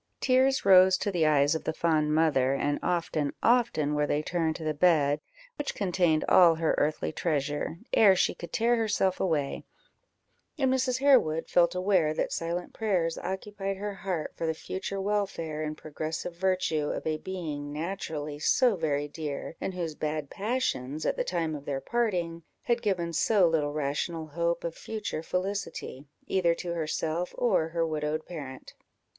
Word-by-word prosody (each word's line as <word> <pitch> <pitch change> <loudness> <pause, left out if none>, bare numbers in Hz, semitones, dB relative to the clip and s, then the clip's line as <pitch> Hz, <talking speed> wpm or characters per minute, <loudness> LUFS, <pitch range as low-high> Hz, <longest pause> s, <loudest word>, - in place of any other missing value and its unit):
Tears 260 0 +3
rose 185 -1 +7
to 205 - -2
the 165 -4 +2
eyes 145 0 +4
of 160 - -3
the - - -2
fond 155 -2 +1
mother, 140 -5 +3
and 145 +1 0
often, 160 -4 -1
often 230 -12 +2
were 150 0 +1
they 150 +1 0
turned 165 -1 -1
to 160 - -7
the 155 0 0
bed 150 -3 +3 0.4
which 290 - -3
contained 175 -5 +1
all 170 -3 +7
her 160 0 +1
earthly 155 +1 0
treasure, 150 0 -2 0.2
ere 200 -4 +6
she - - +2
could 170 - -9
tear 235 +2 +2
herself 205 -4 +1
away; 150 -6 -1 0.9
and 265 -3 +2
Mrs. 255 -1 +1
Harewood 255 - +3
felt 175 0 +3
aware 180 -5 +2
that - - -1
silent 170 +1 -3
prayers 180 -7 0
occupied 195 0 -4
her 205 +1 -4
heart 185 -5 -4
for 165 - -3
the 160 - 0
future 190 +4 -5
welfare 190 -6 -2
and 155 0 -4
progressive 155 +3 -5
virtue 180 -5 0
of - - -4
a 155 -1 -1
being 155 -6 -5
naturally 155 -2 -4
so 245 - +3
very 145 -4 -1
dear, 150 +1 -5
and 190 - -3
whose 170 -3 -3
bad 150 -1 -3
passions, 195 - -2
at - - +1
the - - -1
time 165 -3 -1
of 145 -2 -7
their 135 -1 -2
parting, 180 -6 -1 0.2
had 235 0 +1
given 180 -6 -1
so 185 +2 +4
little 155 -3 +1
rational 150 +3 -2
hope 170 +2 -1
of 170 - -3
future 210 -6 -5
felicity, 180 -6 -4 0.2
either 175 -3 +2
to 175 0 -4
herself 165 +1 -2
or 195 -9 +2
her 165 0 -1
widowed 155 0 -2
parent. 140 -6 -8
165 Hz, 165 wpm, -28 LUFS, 155-190 Hz, 0.9 s, rose